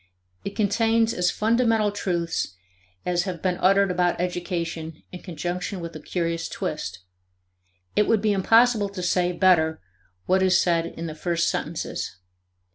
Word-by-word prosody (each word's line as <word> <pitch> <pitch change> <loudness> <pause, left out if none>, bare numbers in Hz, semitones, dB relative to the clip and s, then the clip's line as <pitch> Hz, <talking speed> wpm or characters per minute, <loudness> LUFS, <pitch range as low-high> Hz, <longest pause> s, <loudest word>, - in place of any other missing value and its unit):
It 200 - -5
contains 225 +2 +2
as 180 0 +1
fundamental 225 -1 +2
truths 170 - -2 0.5
as 175 0 +1
have 180 -3 -4
been 180 +1 -1
uttered 195 +1 +4
about 175 -1 +1
education 170 -3 -3
in 180 - -8
conjunction 180 +3 -4
with 170 -1 -7
a - - -6
curious 165 +1 -2
twist. 95 - -4 0.9
It 210 - +3
would 225 - +3
be 210 0 +2
impossible 225 +2 +4
to 190 -2 -6
say 180 0 +2
better 170 -3 +3 0.5
what 190 +1 +3
is 185 -1 +4
said 170 -2 +2
in 165 - -7
the 160 - -4
first 170 +1 0
sentences. - - -4
180 Hz, 145 wpm, -24 LUFS, 170-200 Hz, 0.9 s, uttered